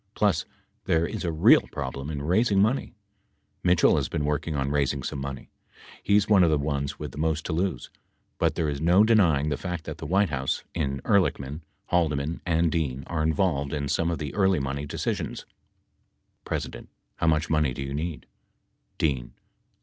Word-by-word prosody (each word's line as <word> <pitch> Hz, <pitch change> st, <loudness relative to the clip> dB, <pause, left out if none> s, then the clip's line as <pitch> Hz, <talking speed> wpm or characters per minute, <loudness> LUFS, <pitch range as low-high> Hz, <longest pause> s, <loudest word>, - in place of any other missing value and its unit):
Plus -, -, +2 dB, 0.4 s
there 80 Hz, 0 st, +2 dB
is -, -, -4 dB
a 85 Hz, -, -1 dB
real 80 Hz, 0 st, +6 dB
problem 70 Hz, +2 st, -5 dB
in 70 Hz, -2 st, -4 dB
raising 100 Hz, +5 st, +2 dB
money. 110 Hz, +7 st, +1 dB, 0.7 s
Mitchell 90 Hz, -2 st, +4 dB
has -, -, -1 dB
been 75 Hz, -, -2 dB
working 75 Hz, +1 st, -1 dB
on 70 Hz, 0 st, -1 dB
raising 70 Hz, -1 st, 0 dB
some 70 Hz, -, -4 dB
money. 70 Hz, -1 st, -6 dB, 0.5 s
He 100 Hz, -, +2 dB
is 105 Hz, -1 st, +3 dB
one 105 Hz, -3 st, +5 dB
of 85 Hz, -, +4 dB
the 75 Hz, -, +3 dB
ones 70 Hz, -1 st, -2 dB
with -, -, -6 dB
the -, -, -9 dB
most 80 Hz, 0 st, 0 dB
to 85 Hz, -, -2 dB
lose. 85 Hz, -5 st, -2 dB, 0.5 s
But -, -, +1 dB
there 80 Hz, -, 0 dB
is 70 Hz, -1 st, -3 dB
no 90 Hz, +5 st, +5 dB
denying 85 Hz, -10 st, +3 dB
the 70 Hz, -, -1 dB
fact 90 Hz, -3 st, -4 dB
that -, -, -7 dB
the -, -, -6 dB
White 95 Hz, +1 st, +2 dB
House, 65 Hz, -2 st, -1 dB
in 70 Hz, -5 st, -2 dB
Ehrlichman, 80 Hz, -7 st, +1 dB, 0.3 s
Haldeman 80 Hz, -2 st, 0 dB
and 85 Hz, -1 st, +2 dB
Dean 70 Hz, -5 st, -1 dB
are 85 Hz, -2 st, -2 dB
involved 80 Hz, -3 st, 0 dB
in 70 Hz, -1 st, -2 dB
some 85 Hz, +4 st, 0 dB
of 85 Hz, -, -1 dB
the 75 Hz, -2 st, -5 dB
early 95 Hz, -4 st, +3 dB
money 70 Hz, +1 st, -3 dB
decisions. -, -, -3 dB
80 Hz, 160 wpm, -26 LUFS, 70-90 Hz, 0.7 s, real